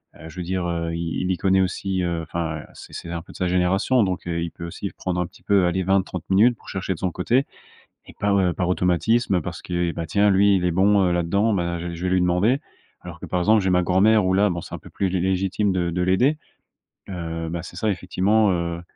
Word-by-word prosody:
heu, 80 Hz, -, -11 dB
je 80 Hz, -, -14 dB
veux 90 Hz, -, -3 dB
dire, 90 Hz, 0 st, -2 dB
heu, 85 Hz, -1 st, -2 dB
il 85 Hz, +1 st, -3 dB
il 95 Hz, -, 0 dB
y 90 Hz, -, 0 dB
connaît 95 Hz, 0 st, +2 dB
aussi, 95 Hz, 0 st, -1 dB
heu 85 Hz, -1 st, -1 dB
enfin, 80 Hz, -1 st, -4 dB
c'est -, -, -13 dB
c'est 85 Hz, -, -7 dB
un 85 Hz, -1 st, -4 dB
peu -, -, -15 dB
de -, -, -11 dB
sa 90 Hz, -, 0 dB
génération. 95 Hz, +7 st, +2 dB
Donc 90 Hz, -2 st, -3 dB
heu, 85 Hz, -1 st, -2 dB
il 85 Hz, -, -4 dB
peut 85 Hz, -, -8 dB
aussi 95 Hz, +3 st, -6 dB
prendre 90 Hz, -1 st, -2 dB
un -, -, -1 dB
petit 85 Hz, -, -20 dB
peu, 100 Hz, -3 st, +3 dB
allez, 95 Hz, +2 st, 0 dB
20-30 95 Hz, -2 st, 0 dB
minutes 110 Hz, +5 st, +4 dB
pour -, -, -21 dB
chercher 95 Hz, 0 st, -2 dB
de 80 Hz, -, -11 dB
son 95 Hz, -, -1 dB
côté 120 Hz, +11 st, +1 dB, 0.6 s
et -, -, -14 dB
par, 100 Hz, -1 st, +2 dB
heu, 90 Hz, -2 st, +2 dB
par 90 Hz, -1 st, -1 dB
automatisme 90 Hz, +3 st, +1 dB
parce -, -, -6 dB
que: -, -, -8 dB, 0.2 s
«Et -, -, -4 dB
ben, 85 Hz, -, -4 dB
tiens, 100 Hz, +3 st, +3 dB
lui, 100 Hz, +1 st, +4 dB
il 90 Hz, -, -1 dB
est 90 Hz, -, +2 dB
bon, 100 Hz, +2 st, +3 dB
heu, -, -, +1 dB
là 85 Hz, 0 st, +1 dB
dedans, 100 Hz, +6 st, +1 dB
bah, 85 Hz, -2 st, -1 dB
je 85 Hz, -, -5 dB
vais 85 Hz, -, -5 dB
je 85 Hz, -, -7 dB
vais 95 Hz, -, 0 dB
lui 90 Hz, -, +3 dB
demander» 95 Hz, +10 st, +2 dB, 0.4 s
alors -, -, -10 dB
que, -, -, -7 dB
par 90 Hz, -, -1 dB
exemple, 105 Hz, +4 st, +4 dB
j'ai 95 Hz, -, +1 dB
ma 90 Hz, 0 st, +3 dB
grand-mère 95 Hz, +4 st, +4 dB
où 95 Hz, -, +2 dB
là, 100 Hz, +2 st, +3 dB
c'est -, -, -11 dB
un -, -, -8 dB
peu -, -, -14 dB
plus 95 Hz, -2 st, -1 dB
lé 95 Hz, -, -1 dB
légitime 95 Hz, +2 st, 0 dB
de 90 Hz, -2 st, 0 dB
de 90 Hz, +2 st, -2 dB
l'aider. 125 Hz, +12 st, +2 dB, 0.7 s
Heu, 85 Hz, -2 st, -4 dB
bah, 85 Hz, 0 st, -4 dB
c'est 90 Hz, -, -10 dB
ça, 110 Hz, +4 st, 0 dB
effectivement, 95 Hz, +3 st, +1 dB
heu 85 Hz, -1 st, -2 dB
90 Hz, 265 wpm, -23 LUFS, 85-100 Hz, 0.7 s, minutes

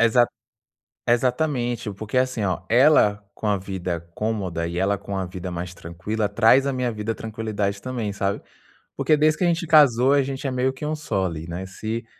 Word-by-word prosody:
Exata 115 Hz, +1 st, +4 dB, 0.8 s
examente, 120 Hz, -2 st, 0 dB
porque, 110 Hz, +5 st, -4 dB
assim, 130 Hz, -4 st, +1 dB
ó, 95 Hz, -2 st, -1 dB
ela 115 Hz, -5 st, +5 dB
com 110 Hz, -, -4 dB
a 105 Hz, -1 st, +2 dB
vida 90 Hz, -3 st, -4 dB
cômoda 95 Hz, -7 st, -2 dB
e 85 Hz, -, -5 dB
ela 100 Hz, +2 st, +1 dB
com 100 Hz, 0 st, -6 dB
a 95 Hz, -, -1 dB
vida 90 Hz, 0 st, -6 dB
mais 90 Hz, +1 st, -5 dB
tranquila, 100 Hz, +6 st, -3 dB
traz 115 Hz, +6 st, +4 dB
à 135 Hz, -, 0 dB
minha 125 Hz, -1 st, -1 dB
vida 110 Hz, +1 st, -3 dB
tranquilidade 105 Hz, -3 st, -3 dB
também, 120 Hz, -5 st, -3 dB
sabe? 100 Hz, 0 st, -2 dB, 0.5 s
Porque 155 Hz, -, +3 dB
desde 155 Hz, +1 st, +3 dB
que -, -, +1 dB
a -, -, +4 dB
gente 170 Hz, -1 st, 0 dB
casou, 140 Hz, -5 st, +6 dB
a 145 Hz, -, +4 dB
gente 135 Hz, +1 st, -4 dB
é 130 Hz, -, -1 dB
meio 130 Hz, +1 st, +1 dB
que 135 Hz, +3 st, -7 dB
1 155 Hz, +1 st, -1 dB
só 100 Hz, -11 st, -1 dB
ali, 80 Hz, -2 st, -4 dB
né? 90 Hz, +2 st, -5 dB
Se 110 Hz, +4 st, -5 dB
110 Hz, 195 wpm, -23 LUFS, 95-130 Hz, 0.8 s, casou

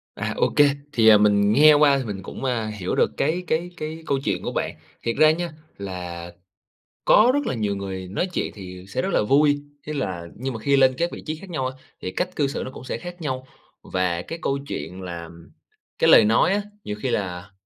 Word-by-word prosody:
À, -, -, -3 dB
ô -, -, +3 dB
kê. 145 Hz, -, +8 dB, 0.3 s
Thì, 115 Hz, -4 st, +4 dB
à, 105 Hz, -1 st, +9 dB
mình 105 Hz, 0 st, +4 dB
nghe 150 Hz, +5 st, +8 dB
qua 145 Hz, -2 st, +5 dB
thì 130 Hz, -, -3 dB
mình 100 Hz, -3 st, -5 dB
cũng, 115 Hz, -, -7 dB
a, 120 Hz, -4 st, 0 dB
hiểu 105 Hz, -4 st, -3 dB
được -, -, +3 dB
cái 165 Hz, +5 st, 0 dB
cái 170 Hz, +3 st, -1 dB
cái 160 Hz, +1 st, -6 dB
câu 140 Hz, -, +1 dB
chuyện 100 Hz, -4 st, -1 dB
của -, -, -3 dB
bạn. -, -, -2 dB, 0.3 s
Thiệt 115 Hz, -, -1 dB
ra 155 Hz, 0 st, +6 dB
nha 170 Hz, 0 st, -2 dB, 0.3 s
là 90 Hz, -3 st, -6 dB, 0.7 s
có 230 Hz, +4 st, +6 dB
rất 290 Hz, -1 st, 0 dB
là -, -, -1 dB
nhiều 105 Hz, -3 st, -1 dB
người 95 Hz, -2 st, -5 dB
nói 110 Hz, -, -1 dB
chuyện -, -, -2 dB
thì 90 Hz, -2 st, -9 dB
sẽ 130 Hz, -, -2 dB
rất -, -, -1 dB
là -, -, +3 dB
vui, 145 Hz, +5 st, +3 dB, 0.2 s
thế 150 Hz, -, -3 dB
là 90 Hz, -, -3 dB
nhưng 130 Hz, +1 st, -4 dB
mà 110 Hz, -, -6 dB
khi 140 Hz, +4 st, +3 dB
lên 130 Hz, -1 st, +5 dB
các 170 Hz, +1 st, +1 dB
vị -, -, -8 dB
trí 155 Hz, -, -2 dB
khác 190 Hz, +3 st, -12 dB
nhau 135 Hz, -6 st, -2 dB
á, 130 Hz, 0 st, -5 dB, 0.3 s
thì 90 Hz, -, -3 dB
cách 180 Hz, 0 st, -3 dB
cư 145 Hz, -, +2 dB
xử 140 Hz, -, -3 dB
nó 130 Hz, -, -6 dB
cũng 130 Hz, -, -11 dB
sẽ -, -, -4 dB
khác 175 Hz, 0 st, -9 dB
nhau. 130 Hz, -3 st, -3 dB, 0.4 s
Và 90 Hz, -2 st, -1 dB
cái 165 Hz, -, -7 dB
câu 140 Hz, 0 st, 0 dB
chuyện 95 Hz, +1 st, -6 dB
làm 85 Hz, -1 st, -8 dB, 0.5 s
cái -, -, +4 dB
lời -, -, +8 dB
nói 115 Hz, -, +4 dB
á, 205 Hz, +1 st, +1 dB, 0.2 s
nhiều 105 Hz, -, -4 dB
khi 130 Hz, -, 0 dB
là 95 Hz, -3 st, -3 dB
125 Hz, 240 wpm, -23 LUFS, 95-150 Hz, 0.7 s, à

